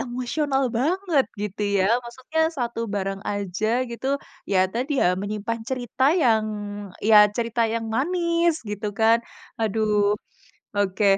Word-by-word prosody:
emosional 270 +3 -1 0.2
banget 330 0 +2 0.2
gitu 210 0 -3 0.2
ya. 185 - +3 0.2
Maksudnya 260 +7 -2
1 240 -5 -3
barang 195 0 -2
aja 200 +1 -2 0.2
gitu, 235 +3 -5 0.5
ya 190 - +4
tadi 255 +6 -2
ya - - +4
menyimpan 215 +3 -3
cerita 255 0 -1
yang, 235 -11 +3 0.6
ya 215 +1 +5 0.2
cerita 235 0 0
yang 225 0 -1
manis 340 +3 +1
gitu 210 0 -3
kan, 225 +1 +5 0.4
aduh 210 -1 +2 0.6
oke. 205 0 +1
230 Hz, 125 wpm, -24 LUFS, 210-270 Hz, 0.6 s, ya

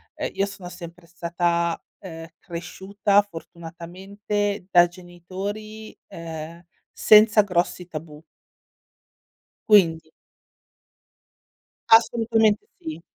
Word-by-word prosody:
ehm, - - -3
io 195 - 0
sono 195 -3 -9
sempre 170 0 -11
stata, 170 0 -1 0.2
ehm, 165 -4 -9
cresciuta, 195 +3 0
fortunatamente, 190 +3 -5
da 175 -1 +6
genitori, 190 +5 -8
ehm, 165 0 -8 0.3
senza 215 0 +6
grossi 180 -2 -1
tabù. 155 -3 -9 1.5
Quindi 165 -6 +4 1.8
Assolutamente 225 -1 +3
sì. 160 +1 -7
180 Hz, 80 wpm, -23 LUFS, 170-205 Hz, 1.8 s, da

